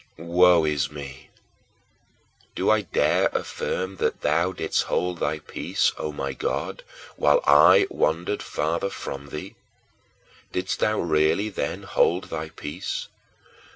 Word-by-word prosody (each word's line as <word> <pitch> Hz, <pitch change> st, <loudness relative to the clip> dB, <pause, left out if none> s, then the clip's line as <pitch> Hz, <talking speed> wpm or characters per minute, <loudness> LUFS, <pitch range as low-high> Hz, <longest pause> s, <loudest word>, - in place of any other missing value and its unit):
7. 80 Hz, -, -10 dB
Woe 90 Hz, -2 st, +6 dB
is 75 Hz, -2 st, 0 dB
me! 70 Hz, -2 st, -9 dB, 1.3 s
Do -, -, +2 dB
I 110 Hz, -1 st, +3 dB
dare 95 Hz, -, +2 dB
affirm 95 Hz, +1 st, -3 dB
that -, -, -1 dB
thou 85 Hz, +5 st, +1 dB
didst -, -, -1 dB
hold 90 Hz, -1 st, -1 dB
thy 75 Hz, -, -1 dB
peace, 75 Hz, -, -1 dB
O 75 Hz, -, -4 dB
my 70 Hz, -2 st, -4 dB
God, -, -, -3 dB, 0.4 s
while 75 Hz, 0 st, +4 dB
I 70 Hz, +1 st, +7 dB
wandered 85 Hz, +6 st, 0 dB
farther 80 Hz, +6 st, -1 dB
away -, -, -7 dB
from 70 Hz, +1 st, -7 dB
thee? 75 Hz, +2 st, -7 dB, 1.0 s
Didst 90 Hz, +1 st, -2 dB
thou 110 Hz, 0 st, +1 dB
really 80 Hz, +5 st, +2 dB
then 100 Hz, -, -4 dB
hold 90 Hz, +3 st, +1 dB
thy 80 Hz, -1 st, -4 dB
peace? 75 Hz, -2 st, -5 dB
80 Hz, 135 wpm, -24 LUFS, 75-90 Hz, 1.3 s, I